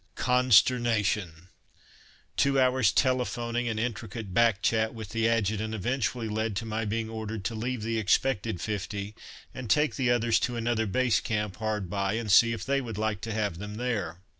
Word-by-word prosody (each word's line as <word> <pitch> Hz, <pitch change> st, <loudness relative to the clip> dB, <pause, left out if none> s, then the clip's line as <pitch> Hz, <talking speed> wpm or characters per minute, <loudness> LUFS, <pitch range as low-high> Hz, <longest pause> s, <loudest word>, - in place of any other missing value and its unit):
Consternation! 115 Hz, -8 st, +2 dB, 0.9 s
Two 140 Hz, -1 st, +2 dB
hours' 130 Hz, -4 st, +3 dB
telephoning 120 Hz, -2 st, 0 dB
and 110 Hz, -2 st, -2 dB
intricate 115 Hz, -3 st, -4 dB
back 115 Hz, -2 st, +3 dB
chat 110 Hz, +1 st, +1 dB
with 110 Hz, -3 st, -7 dB
the 115 Hz, +1 st, +1 dB
Adjutant 110 Hz, -1 st, 0 dB
eventually 120 Hz, +1 st, -1 dB
led 110 Hz, 0 st, -2 dB
to 105 Hz, -, -3 dB
my 110 Hz, 0 st, -2 dB
being 110 Hz, +2 st, -2 dB
ordered 110 Hz, -2 st, -5 dB
to 115 Hz, -, -1 dB
leave 115 Hz, +1 st, -3 dB
the 115 Hz, 0 st, -1 dB
expected 110 Hz, -1 st, +1 dB
fifty 100 Hz, 0 st, -4 dB, 0.4 s
and 125 Hz, -4 st, -7 dB
take 150 Hz, +6 st, +2 dB
the 130 Hz, -3 st, +1 dB
others 120 Hz, -1 st, +3 dB
to 120 Hz, -, -2 dB
another 115 Hz, -1 st, 0 dB
Base 120 Hz, +4 st, +2 dB
Camp 105 Hz, -4 st, -3 dB
hard 105 Hz, -3 st, -2 dB
by, 100 Hz, +2 st, -1 dB
and 110 Hz, -2 st, -2 dB
see 115 Hz, +3 st, +6 dB
if 115 Hz, -, -4 dB
they 140 Hz, +1 st, +1 dB
would 115 Hz, -5 st, -6 dB
like 110 Hz, -2 st, -1 dB
to 115 Hz, -, -4 dB
have 105 Hz, -5 st, -2 dB
them 105 Hz, +1 st, -6 dB
there. 105 Hz, -8 st, -3 dB
110 Hz, 175 wpm, -28 LUFS, 105-120 Hz, 0.9 s, see